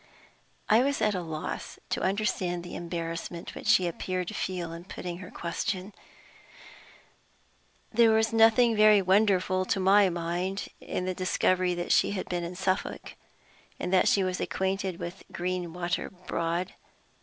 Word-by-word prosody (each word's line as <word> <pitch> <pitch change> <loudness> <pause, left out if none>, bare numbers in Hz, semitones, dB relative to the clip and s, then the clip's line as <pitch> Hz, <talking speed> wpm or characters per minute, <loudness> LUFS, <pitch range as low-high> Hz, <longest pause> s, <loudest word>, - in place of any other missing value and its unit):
I 220 +3 +5
was 280 +2 +1
at 210 - +2
a 185 - -2
loss 160 -2 -5
to - - 0
understand 185 -3 -1
the 175 - -8
embarrassment 170 0 -5
which - - -8
she 215 -4 +5
appeared 180 +1 -3
to - - -7
feel 175 -3 -3
in 170 +1 -8
putting 180 -2 -6
her 185 -1 -9
question. 185 +3 -3 2.0
There 230 0 +6
was 220 0 +2
nothing 225 +1 +5
very 215 -1 +7
wonderful, 185 -1 +3
to 195 - 0
my 195 +1 +5
mind, 175 +3 -3
in 180 - -4
the 185 - -1
discovery 185 0 +1
that 175 0 -3
she - - +4
had 190 - -4
been 175 -1 -2
in 170 +1 -5
Suffolk, 190 0 -2 0.7
and 180 - -3
that 185 - +4
she 195 - +4
was 185 0 -2
acquainted 190 -1 -1
with 175 +3 -7
Greenwater 175 -1 -2 0.2
Broad. 170 +2 -2
185 Hz, 150 wpm, -28 LUFS, 175-200 Hz, 2.0 s, very